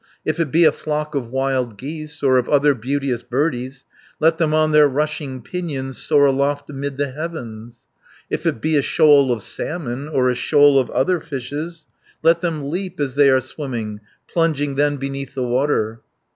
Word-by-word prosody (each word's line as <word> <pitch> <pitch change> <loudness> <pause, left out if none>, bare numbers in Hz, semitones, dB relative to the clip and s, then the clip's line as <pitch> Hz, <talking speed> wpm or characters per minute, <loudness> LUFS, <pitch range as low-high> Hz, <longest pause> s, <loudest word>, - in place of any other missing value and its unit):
If 155 +2 -1
it 165 -3 0
be 170 +1 +5
a 155 - +6
flock 150 0 -3
of 130 -5 -3
wild 130 -3 -1
geese, 150 +4 -7
Or 130 -2 +4
of 125 - -3
other 145 0 +4
beauteous 130 0 -2
birdies, 130 0 -2 0.3
Let 160 +1 +3
them 160 -2 +2
on 155 0 +2
their 150 -1 +6
rushing 145 -2 -3
pinions 140 -7 -4
Soar 145 -2 +4
aloft 140 +1 0
amid 140 0 -5
the 140 -1 -1
heavens. 120 -7 -7 0.4
70 - - -41
"If - - -3
it 110 - -1
be 155 +2 +2
a - - +4
shoal 140 -2 +4
of 115 -4 -2
salmon, 145 -4 -4
Or 130 -4 +2
a - - 0
shoal 145 +2 +4
of 130 - -1
other 170 +8 +1
fishes, 155 +3 -6 0.4
Let 165 +1 +4
them 155 -5 -2
leap 185 0 -4
as 140 -3 -1
they 140 0 +5
are 130 -1 +5
swimming, 120 -6 -5 0.3
Plunging 150 -4 0
then 145 +1 +1
beneath 135 0 -5
the 130 - -1
water. 120 -3 0
140 Hz, 185 wpm, -20 LUFS, 130-155 Hz, 0.4 s, a